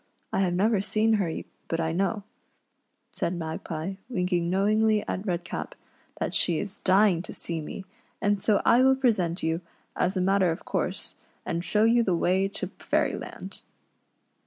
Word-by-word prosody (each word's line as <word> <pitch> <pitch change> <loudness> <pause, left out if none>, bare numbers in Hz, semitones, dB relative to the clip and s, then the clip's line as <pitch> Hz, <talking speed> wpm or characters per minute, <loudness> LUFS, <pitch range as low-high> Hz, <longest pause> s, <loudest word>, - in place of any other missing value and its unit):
I - - +1
have 180 -2 +1
never 205 +2 +3
seen 215 +2 +2
her, 175 - 0 0.4
but 165 - -1
I 160 -1 0
know," 195 +4 0 0.9
said 175 - -2
Magpie, 160 +2 -4
winking 180 -5 0
knowingly 210 +3 +2
at 190 +4 -3
Redcap, 175 -1 -3 0.2
" - - -25
that - - -2
she 170 -3 +2
is 200 +2 -5
dying 190 -2 +4
to - - -9
see 165 -2 -4
me, 190 +5 -7 0.3
and 205 -1 +1
so 205 -1 +2
I 240 - +6
will 265 0 +5
present 210 -10 +1
you, 160 +2 0 0.3
as 185 +2 0
a - - +1
matter 190 0 +3
of 165 - -4
course, - - -2 0.3
and 170 -1 -2
show 210 +3 +2
you 235 +2 +5
the 190 -6 +1
way 185 +3 +2
to 200 - -5
Fairyland." - - -2
190 Hz, 165 wpm, -27 LUFS, 170-210 Hz, 0.9 s, I